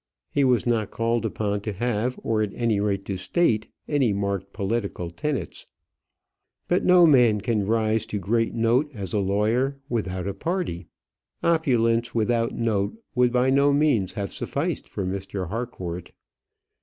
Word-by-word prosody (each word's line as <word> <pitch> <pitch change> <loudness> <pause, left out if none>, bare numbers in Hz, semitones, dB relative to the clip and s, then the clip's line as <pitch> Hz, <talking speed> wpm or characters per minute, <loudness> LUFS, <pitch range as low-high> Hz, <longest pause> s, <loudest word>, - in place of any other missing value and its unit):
He 145 - +2
was 125 -4 +3
not 115 -4 +1
called 115 +1 0
upon 105 -2 -2
to 105 0 -4
have, 120 +3 -1
or 110 -1 +1
at 105 -2 -1
any 115 -4 +1
rate 100 -1 -1
to 95 - -3
state, 110 - +1 0.2
any 135 -8 +2
marked 100 -1 -2
political 100 -4 -3
tenets. 135 - -4 1.0
But 175 - +2
no 180 -1 +7
man 125 -8 +5
can 105 -2 -1
rise 110 0 +1
to 105 - -3
great 115 +4 0
note 120 +6 +2
as 95 -5 -5
a 105 - +2
lawyer 110 +8 +1
without 95 -6 -2
a 100 - -2
party. 165 - -3 0.6
Opulence 120 -9 +2
without 115 +1 +1
note 110 - 0 0.2
would 125 -1 +3
by 125 +1 +2
no 140 +1 +4
means 140 -10 +2
have 100 -2 -4
sufficed - - -2
with 95 - 0
Mr. 95 -1 -4
Harcourt. 95 -7 -5
115 Hz, 155 wpm, -25 LUFS, 100-125 Hz, 1.0 s, no